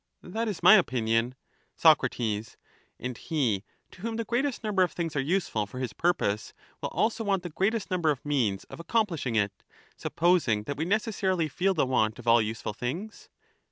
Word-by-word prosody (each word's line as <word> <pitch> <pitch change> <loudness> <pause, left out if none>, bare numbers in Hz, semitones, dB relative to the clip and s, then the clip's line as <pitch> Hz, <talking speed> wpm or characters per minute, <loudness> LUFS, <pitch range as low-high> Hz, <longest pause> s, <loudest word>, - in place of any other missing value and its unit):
That 225 +6 -3
is 205 -5 -4
my - - +9
opinion. 120 - +1 0.4
Soc. 160 -3 +6 1.0
And 125 -1 -5
he 120 -11 0 0.3
to 185 - -15
whom 225 +1 -3
the 230 0 -2
greatest 250 +2 -1
number 205 -3 +1
of 180 - +3
things 165 -3 -3
are - - +1
useful 140 - 0
for 115 - -10
his 130 -3 -3
purpose, 110 -12 0 0.3
will - - -2
also 225 +1 0
want 195 -3 0
the 175 - -6
greatest 200 +6 -1
number 175 -4 +1
of 145 -2 -1
means 120 -10 0
of - - -12
accomplishing 170 - 0
it, 100 -2 0 0.3
supposing 160 -11 +1
that 145 +6 -5
we 155 - -1
necessarily 190 -4 0
feel 190 +6 0
the 150 - +2
want 110 -4 +1
of 120 - -11
all 115 0 +6
useful 110 0 -3
things? 165 - -5
160 Hz, 180 wpm, -28 LUFS, 120-195 Hz, 1.0 s, my